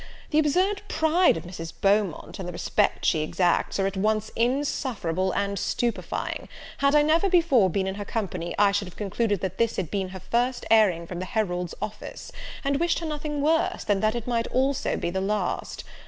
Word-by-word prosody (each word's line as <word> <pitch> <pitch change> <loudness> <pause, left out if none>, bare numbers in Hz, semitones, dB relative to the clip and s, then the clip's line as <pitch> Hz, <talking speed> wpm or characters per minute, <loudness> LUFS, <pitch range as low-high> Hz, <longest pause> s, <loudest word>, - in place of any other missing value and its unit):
The 305 - +4
absurd 365 +7 +2
pride 320 - +3
of - - -6
Mrs. 165 -2 -7
Beaumont, 200 -4 +1
and 185 - -5
the - - -4
respect 170 - 0
she 160 - +3
exacts, 175 +3 +1
are 195 - +2
at 195 0 -2
once 215 +2 0
insufferable 235 - 0
and 200 0 -1
stupifying; 235 +5 -2 0.3
had 280 +1 +3
I 295 - +6
never 325 +6 +3
before 325 - +4
been 190 +2 0
in 190 - -2
her 205 +1 -5
company, 185 -6 -3
I 205 -1 +5
should 200 -1 -1
have 180 - -12
concluded 205 0 -1
that 190 - -4
this 230 -1 +2
had 170 -5 -3
been 195 -2 -1
her 190 0 -8
first 240 +6 -1
airing 195 -7 +4
from 175 +1 -6
the 185 - -3
herald's 180 -6 -2
office, 210 +1 -7 0.3
and 280 0 +1
wished 340 0 +2
her 335 - -4
nothing 295 -1 -3
worse, 320 +2 +1
than 205 -2 +1
that 215 +3 +1
it 235 -2 -4
might 235 -2 0
also 265 +2 0
be 170 - -2
the 190 +1 -1
last. 200 -1 -2
210 Hz, 200 wpm, -26 LUFS, 190-275 Hz, 0.3 s, I